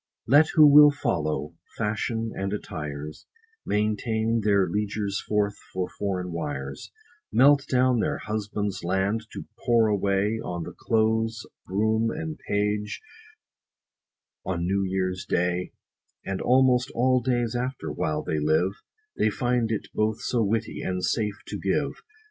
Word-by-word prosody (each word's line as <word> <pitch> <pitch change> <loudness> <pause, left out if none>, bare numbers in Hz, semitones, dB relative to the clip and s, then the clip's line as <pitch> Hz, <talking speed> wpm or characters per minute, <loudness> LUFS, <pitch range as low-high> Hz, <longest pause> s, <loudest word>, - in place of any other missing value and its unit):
Let 145 +6 +6
who 155 -2 +8
will 150 0 +9
follow 80 - -2 0.2
fashions 115 +1 -2
and 95 0 -3
attires, 75 -6 -6 0.4
Maintain 110 +2 0
their 100 -2 +3
liegers 100 +1 -2
forth 105 -1 0 0.2
for 95 -1 -2
foreign 90 -3 -2
wires, 70 -5 -5 0.4
Melt 140 +3 +5
down 125 -1 +3
their - - 0
husbands 105 -2 -3
land, 95 +5 0
to - - -7 0.2
pour 115 -2 +4
away 100 +2 +1
On 85 -1 -4
the - - -8
close 110 0 0 0.2
groom 110 +3 +1
and 160 +3 -5
page, 105 0 -1 1.4
on 85 -2 -2
new 100 +2 +1
year's 95 -1 -1
day, 90 +1 -1 0.5
And 100 -1 -3
almost 130 0 +3
all 130 +1 +3
days 120 -1 0
after, 120 - -3
while 75 +1 -2
they 80 - -1
live; 80 +5 +2 0.5
They 110 - +3
find 120 0 0
it 110 - -2
both 110 0 0
so 120 - 0
witty, 110 +2 -1
and 90 -1 -2
safe 105 +2 -1
to - - -6
give. - - -1
105 Hz, 135 wpm, -26 LUFS, 95-115 Hz, 1.4 s, will